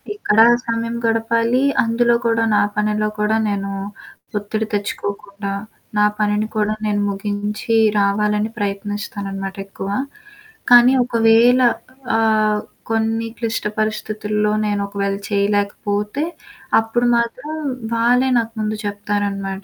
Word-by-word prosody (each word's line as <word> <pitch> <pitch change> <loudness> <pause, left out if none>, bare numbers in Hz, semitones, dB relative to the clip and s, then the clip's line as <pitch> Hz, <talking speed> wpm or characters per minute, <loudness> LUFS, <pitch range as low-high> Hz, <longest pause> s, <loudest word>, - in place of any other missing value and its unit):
ఇక్కడా 225 - +4 0.2
సమయం 230 0 -2
గడపాలి. 230 +3 +1 0.2
అందులో 235 +1 +2
కూడా 230 0 +2
నా - - +4 0.2
పనిలో 210 0 +1
కూడా 215 +1 +2
నేను 195 -1 -2 0.7
ఒత్తిడి 215 +2 -3
తెచ్చుకోకుండా 200 0 -4 0.4
నా 210 - +5
పనిని 210 0 +1
కూడా 210 0 +1
నేను 205 -1 0
ముగించి 205 +2 -2 0.2
రావాలని 210 +2 +1
ప్రయత్నిస్తాననమాట 200 -1 -4
ఎక్కువ. 195 0 -6 0.8
కానీ 245 +2 +8
ఒకవేళ 235 +1 +4 0.6
ఆహ్, 215 -1 +2 0.3
కొన్ని 225 0 0
క్లిష్ట 230 -2 -3
పరిస్థితుల్లో 215 -1 -1
నేను 205 -1 0
ఒకవేళ 200 0 -2
చేయలేకపోతే, 205 +4 0 0.6
అప్పుడు 230 +2 0
మాత్రం 235 +6 -2 0.4
వాళ్ళే 245 +3 +3
నాకు 230 -1 -1
ముందు 215 0 -2
చెప్తారనమాట. 200 -1 -3
210 Hz, 105 wpm, -19 LUFS, 205-230 Hz, 0.8 s, కానీ